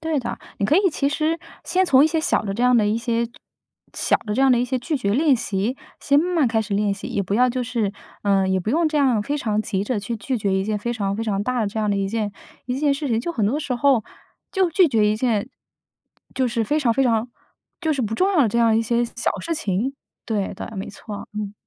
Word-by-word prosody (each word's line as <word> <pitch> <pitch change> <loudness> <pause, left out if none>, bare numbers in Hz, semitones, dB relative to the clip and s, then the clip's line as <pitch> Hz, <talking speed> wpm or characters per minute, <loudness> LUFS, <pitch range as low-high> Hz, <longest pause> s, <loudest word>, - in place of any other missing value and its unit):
对 320 -2 -1
的， 245 - -4 0.2
你 200 - 0
可 300 - +4
以 390 -1 +4
其 280 -1 0
实 310 +3 0 0.3
先 370 +2 +2
从 275 -6 +5
一 - - +5
些 315 0 0
小 - - +1
的 195 -2 -3
这 240 - -2
样 250 -1 +5
的 215 - +3
一 210 +2 +1
些 235 0 0 0.7
小 - - +2
的 210 -2 -4
这 265 - 0
样 270 - +5
的 245 - +4
一 245 - +1
些 255 +1 -1
拒 300 +5 -2
绝 200 -6 -1
练 285 +2 +4
习， 220 +2 -2 0.2
先 280 0 +3
慢 355 +3 0
慢 290 -7 +3
开 225 -1 +1
始 210 - -6
练 205 0 +1
习， 195 - -8
也 200 - -1
不 195 +2 -2
要 250 +2 +4
就 255 +1 -2
是 230 -5 -1 0.3
呃， 195 -2 +2
也 190 - +2
不 200 +4 -2
用 325 +3 +2
这 305 - -2
样 260 -7 +3
非 290 +7 -2
常 215 -7 0
急 200 -2 -2
着 220 -2 -1
去 230 +3 -4
拒 250 +3 -2
绝 200 -2 0
一 190 - 0
件 210 0 -1
非 235 +3 -2
常 200 -3 -2
非 225 - -2
常 205 -3 -1
大 250 +2 -1
的 215 - +1
这 210 +2 -4
样 210 -1 +1
的 200 - +1
一 195 0 -1
件 210 -1 -2 0.3
一 250 +1 -2
件 285 -1 +2
事 280 +1 -3
情。 230 -2 +1
就 340 - -3
很 220 -8 0
多 280 +9 0
时 275 -4 -2
候 255 -2 +3 0.5
就 375 -3 +2
拒 360 -1 +4
绝 220 -4 +3
一 - - +1
件 230 -1 0 0.9
就 260 -2 +1
是 230 -1 -1
非 300 +8 0
常 245 -5 +3
非 270 - +2
常 230 0 +1 0.5
就 320 -3 +1
是 275 - -1
不 220 -1 -1
重 380 - +2
要 340 - +4
的 230 - +3
这 235 - 0
样 230 -1 +4
一 - - +3
些 235 +1 +1
小 235 0 -2
事 330 - -2
情。 240 - -1 0.3
对 205 -4 -2
对， - - -6
没 195 - -4
错。 205 0 -8
嗯。 210 -1 -4
235 Hz, 290 characters per minute, -22 LUFS, 210-280 Hz, 0.9 s, 从